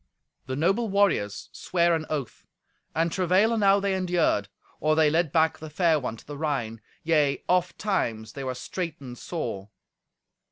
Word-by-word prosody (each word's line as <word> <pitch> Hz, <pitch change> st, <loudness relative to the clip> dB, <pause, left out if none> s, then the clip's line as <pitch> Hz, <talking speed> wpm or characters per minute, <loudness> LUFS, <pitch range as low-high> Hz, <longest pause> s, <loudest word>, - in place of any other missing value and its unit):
The 130 Hz, -, -3 dB
noble 195 Hz, -, +1 dB
warriors 190 Hz, -, +1 dB
sware 170 Hz, -1 st, +1 dB
an 160 Hz, -1 st, -1 dB
oath; 145 Hz, -6 st, -5 dB, 0.5 s
and 165 Hz, +1 st, +1 dB
travail 190 Hz, +5 st, +3 dB
enow 200 Hz, -3 st, +4 dB
they 200 Hz, -1 st, 0 dB
endured, 175 Hz, -, +1 dB, 0.3 s
or 155 Hz, 0 st, +2 dB
they 155 Hz, -1 st, +4 dB
led 165 Hz, -2 st, +1 dB
back 160 Hz, 0 st, +2 dB
the 155 Hz, -, -8 dB
fair 160 Hz, 0 st, +2 dB
one 125 Hz, -4 st, -4 dB
to -, -, -16 dB
the 145 Hz, -1 st, -8 dB
Rhine; 120 Hz, -8 st, -2 dB, 0.2 s
yea, 150 Hz, -4 st, +2 dB
ofttimes 180 Hz, -, 0 dB
they 140 Hz, -, -6 dB
were 130 Hz, -1 st, -3 dB
straightened 140 Hz, -6 st, -6 dB
sore. 105 Hz, -, -5 dB
160 Hz, 155 wpm, -26 LUFS, 135-180 Hz, 0.5 s, enow